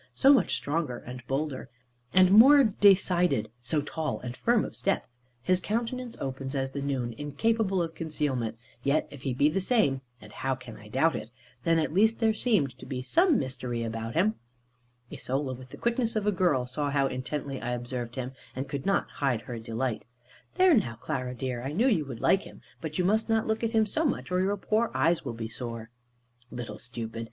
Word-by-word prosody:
So 275 +1 +7
much 265 - +3
stronger, 145 -4 -2
and 125 +1 -8
bolder, 135 -1 -2 0.4
and 185 +2 +6
more 270 +7 +9
decided, 185 - +3
so 135 +5 0
tall 155 0 -3
and 125 -1 -6
firm 235 - +2
of - - -8
step. 195 - 0 0.4
His 185 +6 +2
countenance 235 +3 -3
open 135 +1 -4
as 135 0 -1
the 140 - -4
noon, 130 -4 -2
incapable 190 +6 +1
of 165 -1 -5
concealment; 145 -9 -2 0.2
yet 140 +3 +1
if 140 - -10
he 130 -2 -2
be 140 +3 +4
the 170 +6 0
same 185 - +2 0.2
(and, 105 -1 -13
how 135 0 -1
can 125 -3 -11
I 105 - -13
doubt 135 +9 +2
it?), 110 - -5 0.4
then 165 -1 +4
at 155 -1 0
least 220 +5 +4
there 220 -1 +3
seemed 190 - +1
to - - -10
be 130 -2 -4
some 335 - +4
mystery 125 - -3
about 115 0 -4
him. 210 +6 +2 0.7
Isola, 135 0 -2
with 130 0 -10
the - - -10
quickness 235 -1 0
of 215 -2 0
a 210 - +3
girl, 170 -9 +2
saw 145 +3 -2
how 140 -1 +2
intently 135 +1 -4
I 125 0 -2
observed 120 -1 -4
him, 130 0 -4 0.2
and 135 +2 -3
could 140 +2 -4
not 195 - +2
hide 130 -6 -1
her 120 -1 -6
delight. 115 +1 -3 0.5
"There 370 -2 +6
now, 190 - +2
Clara 125 -1 -4
dear, 125 -1 -3
I 135 +4 -4
knew 220 +10 +2
you 180 - +2
would 125 -4 -7
like 190 - +4
him. - - -13 0.2
But 155 -1 -4
you 180 - +1
must 220 +4 +2
not 225 0 +2
look 220 +1 -1
at 230 0 0
him 220 -1 +4
so 310 +10 -1
much, 280 - -1
or 180 0 +2
your 200 +2 +1
poor 220 +4 +1
eyes 160 +6 +2
will - - -4
be 115 -1 -5
sore." 115 -1 -7 0.6
Little 115 -4 -7
stupid! 115 -2 -6
145 Hz, 205 wpm, -28 LUFS, 125-200 Hz, 0.7 s, more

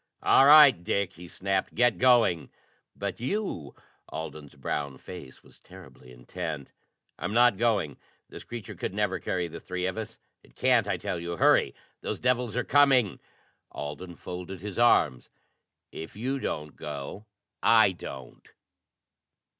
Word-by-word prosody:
"All 135 - +6
right, 145 - +8
Dick," 100 -1 -1
he 90 +1 -11
snapped. 95 +1 -2
"Get 120 +1 +3
going!" 120 - +4 0.5
"But 100 -2 -4
you?" 130 - -3 0.3
Alden's 75 -3 -7
brown 70 0 -4
face 75 -3 -11
was - - -19
terribly 65 - -15
intent. 75 +4 -6 0.5
"I'm 90 +7 -3
not 120 -2 +5
going! 100 - 0 0.3
This - - -10
creature 120 -4 -8
could 95 - -5
never 100 -3 0
carry 90 0 -2
the 85 0 -9
three 90 0 -4
of 95 +4 -2
us. 110 +1 -7 0.2
It - - -23
can't, - - +3
I - - 0
tell 85 - -4
you! 85 0 -5
Hurry, - - +4 0.3
those - - -3
devils 125 -2 0
are 125 - +1
coming!" 135 -7 +4 0.5
Alden 85 +5 -7
folded 90 +2 -7
his 105 +2 -5
arms. 75 - +3 0.6
"If 80 - -8
you 130 +6 -2
don't 75 - -4
go, 75 +8 -7 0.3
I 110 -3 +6
don't." 65 -8 -10
95 Hz, 145 wpm, -27 LUFS, 80-115 Hz, 0.6 s, right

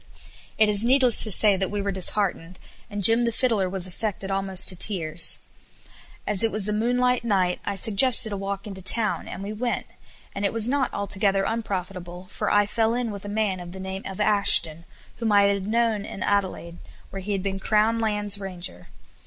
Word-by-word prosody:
It 220 - +4
is 210 0 +2
needless 255 -1 +4
to 220 - +3
say 205 +1 +5
that 190 0 -3
we 205 - -4
were 200 0 -3
disheartened, 185 -2 -1 0.3
and 205 -1 -6
Jim 225 +4 +7
the 235 - -1
Fiddler 225 -6 -1
was 190 -1 +1
affected 195 +1 -4
almost 195 -1 +2
to 185 - 0
tears. 170 -4 +3 0.9
As 205 -3 +2
it 225 - 0
was 210 -1 -1
a 210 - -1
moonlight 245 +2 -1
night, 190 -5 -1
I 200 - -4
suggested 220 +3 +4
a - - -4
walk 195 0 -6
into 195 -2 -9
town, 215 +4 +1
and 195 - -8
we 205 +2 -6
went; 240 +2 -4 0.5
and 200 - -6
it 200 - 0
was 230 0 +1
not 270 0 -1
altogether 195 -1 -1
unprofitable, 185 -4 -6
for - - -4
I 205 0 +2
fell 225 +2 -1
in 245 -2 -3
with 200 -1 -10
a - - -7
man 205 -3 -2
of 175 0 -10
the 190 - -10
name 190 0 -7
of 195 0 -9
Ashton, 200 -6 +3 0.3
whom 230 -2 -3
I 205 -1 +4
had 200 -1 -1
known 225 -2 -1
in 195 - -8
Adelaide, 190 -4 -3 0.3
where 195 - -7
he 205 +2 -5
had 195 -2 -4
been 195 -1 -4
Crown 220 +3 0
Lands 210 -2 0
Ranger. 185 -2 -7
200 Hz, 200 wpm, -23 LUFS, 190-220 Hz, 0.9 s, Jim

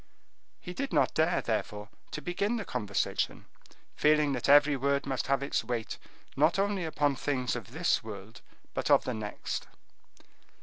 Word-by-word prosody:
He 180 - -7
did 275 +6 -3
not - - +3
dare, 160 +1 +2
therefore, 105 -2 -3 0.2
to 150 - -6
begin 200 +7 0
the 220 - -3
conversation, 100 -1 -2 0.5
feeling 150 -1 +3
that 125 0 -2
every 145 0 +7
word 140 +1 0
must 135 -2 -2
have 140 0 +1
its 140 - 0
weight 120 -3 -3 0.4
not 155 +7 +3
only 195 -2 0
upon 145 -3 +1
things 130 -1 -1
of 115 -6 -6
this - - +1
world, - - -9 0.3
but - - -2
of - - +6
the 125 - -2
next. 105 -2 -4
140 Hz, 160 wpm, -30 LUFS, 125-160 Hz, 0.5 s, every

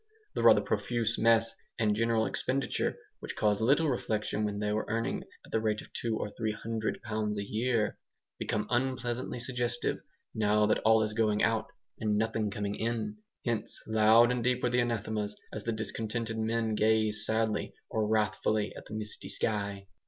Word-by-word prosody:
The - - -1
rather - - +7
profuse 115 -2 0
mess 115 0 +4 0.2
and 105 -2 +2
general 115 0 +2
expenditure, 135 +2 -1 0.2
which - - -6
caused 105 0 +2
little 140 +8 +4
reflection 110 -5 -1
when 105 -1 -1
they 105 0 -1
were 110 - -1
earning 115 +1 -1 0.2
at - - -16
the 110 - +1
rate 110 -1 0
of - - -11
two 115 -2 -1
or - - -2
three 110 0 -2
hundred 110 0 -3
pounds 105 -1 -2
a 100 - -1
year, 110 -1 0 0.4
became 105 0 -1
unpleasantly 125 -1 -1
suggestive, 120 -1 -1 0.3
now 105 0 +3
that 105 - +2
all 110 0 +5
is 105 0 -2
going 105 -1 +2
out 110 -1 +2 0.3
and 105 -1 +1
nothing 110 -1 0
coming 100 0 -2
in. 110 -1 -2 0.3
Hence 115 -2 -2
loud 110 +2 +6
and 125 -1 -1
deep 125 +1 +1
were 125 - +2
the 125 - +3
anathemas 110 -3 -2 0.2
as 110 - -5
the 115 - +1
discontented 110 +1 -3
men 110 0 0
gazed 110 -1 +2
sadly 110 -2 0
or 110 -1 0
wrathfully 105 0 +1
at - - -9
the 110 - -6
misty 105 -1 -5
sky. 100 -2 -2
110 Hz, 175 wpm, -31 LUFS, 105-115 Hz, 0.4 s, rather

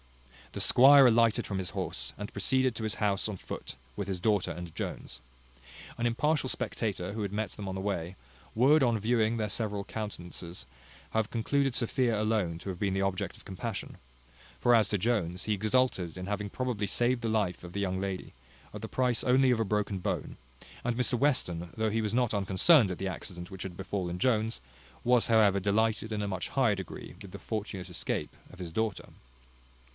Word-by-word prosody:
The - - -4
squire 135 +2 +8
alighted 115 -2 +3
from 100 -2 -2
his 90 -2 -3
horse, - - -3
and 105 +1 -6
proceeded 130 -2 +1
to 115 - -4
his 110 0 -1
house 105 0 0
on 100 - -4
foot, - - -7 0.2
with 100 - -4
his 95 -2 -2
daughter 105 0 +1
and 85 -2 -7
Jones. - - -5 0.8
An 120 - -1
impartial 135 +4 +1
spectator, 105 -6 -2
who 110 - -4
had 100 -2 -2
met 110 +2 -2
them 100 -2 -6
on 95 - -4
the - - -3
way, 95 -3 -2 0.4
would, 140 +7 +5
on 120 -3 +2
viewing 115 +1 +2
their 110 -1 0
several 105 -1 -1
countenances, 90 - -6 0.5
have 110 0 0
concluded 135 +3 +1
Sophia 115 -2 +1
alone 105 -6 0
to 100 - -7
have 90 -2 -5
been 100 -2 0
the 95 - 0
object 95 -1 -2
of - - -18
compassion: 100 +3 -5 0.6
for 120 0 +5
as 110 -3 +3
to 105 - +1
Jones, 90 -4 0
he 110 - 0
exulted 105 -4 +1
in 90 - -5
having 100 +1 -3
probably 120 -3 -2
saved 120 +4 +1
the 115 - -1
life 105 -6 0
of 90 - -8
the 100 - -4
young 95 -1 -1
lady, 95 -1 -4 0.4
at - - -7
the - - -6
price 125 -2 +1
only 130 +1 +4
of 120 - +2
a - - +3
broken 105 -1 -1
bone; - - -3 0.5
and 120 -1 -1
Mr 125 -1 +2
Western, 90 - 0
though 110 -1 +1
he 115 +1 +1
was 105 -1 -1
not 120 -2 +2
unconcerned 100 - +5
at 90 - -4
the 95 - -3
accident 90 -1 -6
which 95 -1 -6
had 90 -2 -7
befallen 95 -2 -3
Jones, 115 -1 +1 0.4
was, 125 -1 +4
however, 105 -4 +5
delighted 110 +2 +1
in 105 -1 -1
a - - -2
much 95 -2 -3
higher 130 -6 +2
degree 95 -3 -8
with - - -10
the - - -8
fortunate 100 -4 -4
escape 90 - -3 0.2
of 95 - -14
his 85 -3 -6
daughter. 110 -1 -2
105 Hz, 200 wpm, -30 LUFS, 95-115 Hz, 0.8 s, squire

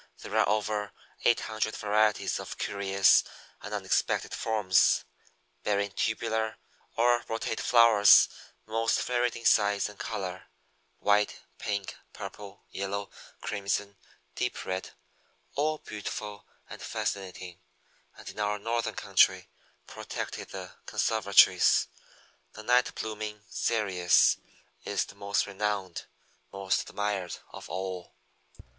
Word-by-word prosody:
There - - -6
are - - +4
over 105 -1 -1 0.3
eight 120 - +4
hundred 110 0 -2
varieties 105 0 +1
of - - -7
curious 100 -1 +3 0.4
and - - -8
unexpected - - 0
forms, 105 -5 +2 0.6
bearing 100 -1 0
tubular 110 +1 -1 0.4
or 120 +1 +3
rotate 115 0 -3
flowers 115 -4 +7 0.4
most 115 +1 +1
varied 120 -1 0
in 115 - -9
size 105 -2 +4
and 105 -1 -12
color 95 -2 -5 0.5
white, 105 0 +2 0.2
pink, 100 -2 -3 0.2
purple, 100 -2 -9
yellow, 100 +1 -4 0.3
crimson, 100 0 -2 0.4
deep - - -3
red 95 0 -3 0.6
all 155 +2 0
beautiful 105 -3 -6 0.2
and - - -10
fascinating, 90 -2 -4 0.6
and - - -13
in - - -8
our 105 0 0
Northern 115 +3 -2
country, - - +3 0.4
protected - - -6
in 95 - -5
the 90 +1 -10 0.2
conservatories. 100 - +4 0.7
The 110 - -10
Night 125 +2 +3
blooming 105 -1 -5
Cereus 95 -6 +3 0.5
is - - -2
most 100 0 0
renowned, 100 -2 -3 0.5
most 95 -1 -1
admired 100 -3 -2
of - - -10
all. 90 -1 -5
105 Hz, 110 wpm, -29 LUFS, 95-110 Hz, 0.7 s, flowers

